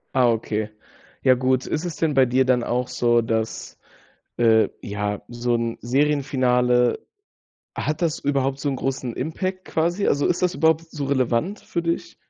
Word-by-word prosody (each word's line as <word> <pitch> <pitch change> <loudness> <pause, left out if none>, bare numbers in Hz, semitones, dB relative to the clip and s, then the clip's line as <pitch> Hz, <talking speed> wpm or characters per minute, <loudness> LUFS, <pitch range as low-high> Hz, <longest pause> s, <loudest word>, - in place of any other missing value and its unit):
Ah, 125 -2 +4
okay. 110 -1 -2 0.5
Ja, 130 - +6
gut. 130 0 +1
Ist 160 +3 -2
es 170 -2 -4
denn 160 -2 0
bei 135 -1 +5
dir 130 +2 +2
dann 125 -2 +2
auch 125 +1 -1
so, 120 -1 +2
dass, 110 -1 -3 0.6
äh, 110 -2 +4
ja, 105 -2 -3
so 120 0 -1
'n 115 0 -2
Serienfinale 125 -3 +2 0.8
hat 155 0 -2
das 165 -3 0
überhaupt 135 -1 0
so 145 - -1
'n 135 - -1
großen 130 -2 -3
Impact, 185 +6 -3
quasi? 175 +5 0
Also, 140 - +2
ist 175 - 0
das 180 -1 +1
überhaupt 160 +2 +2
so 145 -2 -4
relevant 135 - 0
für 205 -5 -3
dich? 165 0 -3
130 Hz, 165 wpm, -23 LUFS, 120-155 Hz, 0.8 s, Ja